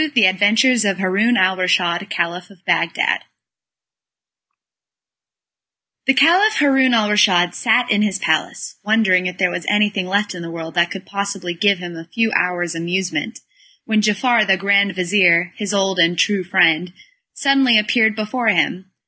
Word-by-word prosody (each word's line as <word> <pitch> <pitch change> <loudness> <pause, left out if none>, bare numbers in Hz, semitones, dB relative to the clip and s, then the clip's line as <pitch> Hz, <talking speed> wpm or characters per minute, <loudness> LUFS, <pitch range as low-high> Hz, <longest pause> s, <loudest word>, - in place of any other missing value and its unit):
The 230 -5 +5
Adventures 220 +6 +2
of 195 -2 -1
Haroun 200 +6 0
al 185 0 +2
Raschid, 185 0 -1
Caliph 175 +1 -4
of 195 -3 -21
Bagdad - - 0 2.9
The 270 - +3
Caliph 365 +10 +3
Haroun 270 -4 +2
al 215 -2 +1
Raschid 185 -4 +2
sat 245 +1 0
in 205 0 +2
his 205 -2 -1
palace, 160 -4 -3
wondering 205 -4 +1
if 180 0 -7
there 180 -2 0
was 170 - -6
anything 210 -2 0
left 205 +2 -1
in 180 - -9
the 165 - -8
world 165 -1 -8
that 175 0 +1
could 195 -1 -9
possibly 200 -3 -5
give 200 +3 +1
him 175 -1 -9
a 165 0 -10
few 225 -1 0
hours' 175 -3 -1
amusement, 175 +3 -4 0.4
when 220 -1 0
Giafar 215 +1 +1
the 190 0 +3
grand 200 0 +1
vizir, 180 -2 +2
his 205 -2 -5
old 195 -2 -1
and 170 0 +2
tried 195 -1 0
friend, 175 -2 +1 0.4
suddenly 275 -4 +2
appeared 220 +1 +1
before 220 +2 -4
him. 185 -1 0
195 Hz, 155 wpm, -18 LUFS, 180-215 Hz, 2.9 s, The